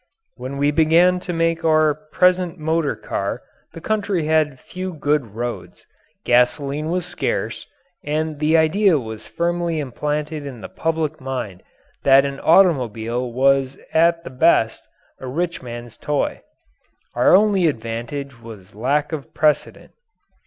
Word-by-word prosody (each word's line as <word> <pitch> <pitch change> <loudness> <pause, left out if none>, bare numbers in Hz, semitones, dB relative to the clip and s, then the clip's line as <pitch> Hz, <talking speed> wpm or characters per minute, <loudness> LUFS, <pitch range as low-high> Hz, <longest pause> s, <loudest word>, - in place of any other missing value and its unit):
When 130 +2 -6
we 145 +1 +2
began 165 +4 +4
to 180 - -5
make 165 -1 0
our 155 -1 +4
present 180 +4 +1
motor 160 -1 0
car - - -4 0.3
the 165 - -9
country 205 -4 -1
had 155 -4 +1
few 185 0 -6
good 145 -8 -1
roads, 120 +1 -6 0.4
gasoline 140 +5 +1
was 180 0 -1
scarce, - - -3 0.4
and 155 0 -2
the 155 +2 +3
idea 170 +3 +3
was 110 -4 -7
firmly 170 -1 -1
implanted 150 +2 -3
in 130 -5 -8
the - - -8
public 160 -2 -2
mind 125 -9 -5 0.4
that 135 0 +5
an 140 0 -4
automobile 125 - +2
was 135 +1 +2 0.2
at 165 +1 +3
the - - -8
best 130 -5 +2 0.4
a 130 - -7
rich 170 +6 -2
man's 120 -2 -9
toy. 145 -1 -1 0.7
Our 125 +8 +5
only 195 -3 +4
advantage 120 +1 -4
was 105 -5 -12
lack 145 +7 0
of 150 -4 -6
precedent. 155 -1 0
150 Hz, 135 wpm, -21 LUFS, 130-165 Hz, 0.7 s, that